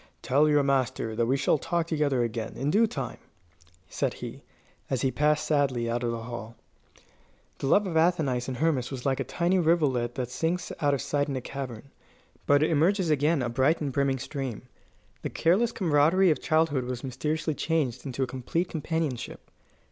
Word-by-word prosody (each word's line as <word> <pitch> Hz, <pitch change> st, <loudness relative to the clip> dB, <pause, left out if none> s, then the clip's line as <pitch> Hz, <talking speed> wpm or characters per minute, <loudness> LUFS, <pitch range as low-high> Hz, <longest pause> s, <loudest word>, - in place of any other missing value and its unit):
"Tell 145 Hz, +4 st, +3 dB
your 145 Hz, -1 st, +4 dB
master 130 Hz, -5 st, 0 dB
that 115 Hz, 0 st, +1 dB
we 135 Hz, +3 st, +2 dB
shall 140 Hz, +2 st, +2 dB
talk 170 Hz, +2 st, -1 dB
together 150 Hz, -6 st, +1 dB
again, 115 Hz, -1 st, -4 dB
in 140 Hz, +3 st, 0 dB
due 225 Hz, +5 st, +4 dB
time," 135 Hz, -, -5 dB, 0.7 s
said -, -, -2 dB
he, -, -, -8 dB, 0.5 s
as 130 Hz, -1 st, -1 dB
he 135 Hz, -, +2 dB
passed 150 Hz, +2 st, +1 dB
sadly 135 Hz, -6 st, +1 dB
out 120 Hz, +1 st, -1 dB
of 120 Hz, -, 0 dB
the 115 Hz, -1 st, -4 dB
hall. 115 Hz, -1 st, -7 dB, 1.0 s
The 135 Hz, -, -2 dB
love 205 Hz, +8 st, +4 dB
of 175 Hz, -4 st, -4 dB
Athenais 160 Hz, -7 st, +2 dB
and 130 Hz, -2 st, -4 dB
Hermas 135 Hz, -4 st, +1 dB
was 130 Hz, -3 st, -6 dB
like 135 Hz, -1 st, +1 dB
a -, -, 0 dB
tiny 180 Hz, +2 st, +1 dB
rivulet 145 Hz, -8 st, +1 dB
that 125 Hz, -2 st, -3 dB
sinks 170 Hz, +5 st, -2 dB
out 145 Hz, -1 st, +3 dB
of 135 Hz, -, -4 dB
sight 145 Hz, 0 st, 0 dB
in 135 Hz, -, -2 dB
a -, -, -1 dB
cavern, 135 Hz, 0 st, -7 dB, 0.6 s
but 145 Hz, +1 st, +5 dB
emerges 165 Hz, +3 st, +2 dB
again 150 Hz, 0 st, +2 dB
a 120 Hz, -, -1 dB
bright 130 Hz, +7 st, +2 dB
and 145 Hz, -3 st, -2 dB
brimming 140 Hz, 0 st, +1 dB
stream. 135 Hz, -3 st, -5 dB, 0.6 s
The -, -, -3 dB
careless 195 Hz, +8 st, +2 dB
comradery 170 Hz, 0 st, +3 dB
of 155 Hz, -, -1 dB
childhood 155 Hz, -5 st, +1 dB
was 125 Hz, -1 st, -5 dB
mysteriously 150 Hz, +5 st, -2 dB
changed 145 Hz, -6 st, -1 dB
into 135 Hz, -1 st, -2 dB
a -, -, +2 dB
complete 130 Hz, +8 st, -2 dB
companionship. 155 Hz, -5 st, -3 dB
140 Hz, 185 wpm, -27 LUFS, 125-160 Hz, 1.0 s, but